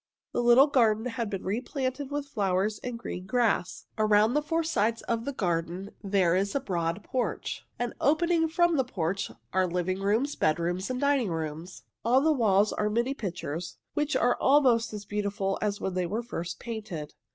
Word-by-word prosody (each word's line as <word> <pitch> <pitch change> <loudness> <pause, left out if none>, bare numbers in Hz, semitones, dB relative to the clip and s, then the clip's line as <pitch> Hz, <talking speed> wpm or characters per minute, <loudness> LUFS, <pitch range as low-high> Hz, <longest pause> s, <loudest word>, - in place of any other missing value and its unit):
The - - 0
little 240 +3 +7
garden 230 -6 +2
has 235 -2 -2
been 195 -2 -4
replanted 260 +6 -2
with 290 0 -3
flowers 205 -4 0
and 245 -2 -5
green 185 -5 -6
grass. 230 -6 0
Around 215 +1 +4
the 300 - +2
four 325 +2 0
sides 230 -8 0
of 230 0 -2
the 280 - -1
garden 175 -3 -2
there 190 -4 +2
is 195 +4 0
a - - +3
broad 175 -5 -2
porch, 255 -2 -2 0.2
and 245 0 -2
opening 325 +2 +3
from 345 0 +2
the 265 - +3
porch 190 -5 -2 0.2
are 185 -1 +3
living 180 +2 -1
rooms, 225 +9 +1
bedrooms, 170 +5 0
and 255 0 -2
dining 280 -6 +2
rooms. 160 +2 -5 0.2
On 255 +4 +4
the 315 0 +4
walls 210 -5 +3
are 210 - 0
many 235 +5 0
pictures, 175 - -5 0.2
which 300 0 0
are 245 +1 +2
almost 255 -5 +4
as 210 -1 -7
beautiful 200 -1 -2
as 205 -1 -1
when 190 - -2
they 180 -1 0
were 220 +6 -2
first 170 -7 -5
painted. 210 -10 -6
215 Hz, 180 wpm, -28 LUFS, 185-255 Hz, 0.2 s, little